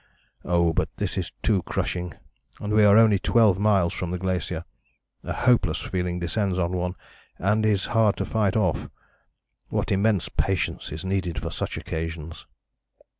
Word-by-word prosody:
Oh! 85 -1 +2
But - - 0
this - - -2
is - - -3
too 105 -4 +2
crushing, 90 0 -3 0.4
and 105 0 -3
we 105 0 +5
are 105 0 +7
only 110 -3 +5
12 105 -4 +3
miles 100 -5 +3
from 90 - -4
the 90 - -2
glacier. 90 -2 -2 0.6
A - - -5
hopeless 125 -1 +2
feeling 90 -1 -2
descends 95 +2 -1
on 85 -1 0
one 90 0 -2 0.4
and 105 +4 +1
is 100 -3 +1
hard 110 -3 +3
to - - -1
fight 105 -4 0
off. 95 -7 0 0.8
What - - -1
immense 100 -1 +2
patience 95 -4 -1
is 80 +5 -6
needed 95 -5 -1
for - - -5
such - - -4
occasions!" 80 0 -5
95 Hz, 160 wpm, -25 LUFS, 85-105 Hz, 0.8 s, are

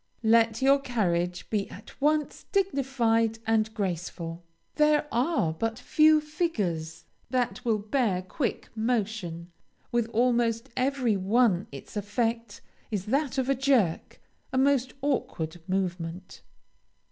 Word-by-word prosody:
Let 225 +2 +3
your 275 +1 +5
carriage 180 -9 -1
be 205 -2 0
at 210 - -13
once 300 0 0
dignified 250 - +1
and 220 -1 +2
graceful. 175 -3 -3 0.4
There 300 0 +4
are 245 - +1
but 225 +6 -2
few 310 0 +4
figures 195 - -2 0.2
that 250 -1 -1
will 230 -4 +2
bear 210 -3 0
quick 230 +6 -3
motion; 210 -7 -2 0.4
with 235 -1 +1
almost 235 +1 +1
every 255 -3 +1
one 195 -1 +2
its 140 +8 -10
effect 230 +3 -2 0.3
is 200 -4 -3
that 275 +4 0
of 260 -1 +1
a 275 - +3
jerk, 255 -10 +1 0.3
a 260 - -1
most 265 -1 +2
awkward 175 - -2
movement. 185 -1 -3
230 Hz, 120 wpm, -27 LUFS, 190-265 Hz, 0.4 s, your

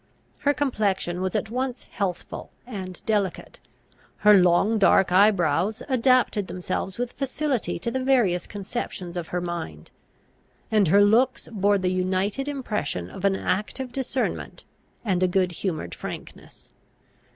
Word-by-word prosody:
Her 285 0 +2
complexion 200 -9 0
was 190 +3 -2
at 215 +1 -1
once 255 +1 -2
healthful 185 -4 -4 0.2
and 190 -7 -7
delicate; 205 -4 -1 0.7
her 210 - +9
long 195 +4 +4
dark 195 -2 +4
eye 200 +4 +7
brows 180 +2 0
adapted 255 -6 +3
themselves 185 +1 -4
with 245 0 -2
facility 275 -2 -2
to 230 +7 -3
the 260 +1 -2
various 235 -10 +2
conceptions 195 -3 -5
of 175 -2 -4
her 180 - -2
mind; 170 - -6 0.8
and 210 -4 +4
her 200 +5 +6
looks 235 +6 +3
bore 205 -1 +2
the 185 -1 0
united 190 +8 -1
impression 210 - -3
of 190 - -5
an 195 -1 +3
active 215 +7 -2
discernment 260 0 -3 0.4
and 185 -4 +1
a 185 - +4
good 180 0 +1
humoured 160 - -3
frankness. - - -9
200 Hz, 140 wpm, -25 LUFS, 180-240 Hz, 0.8 s, her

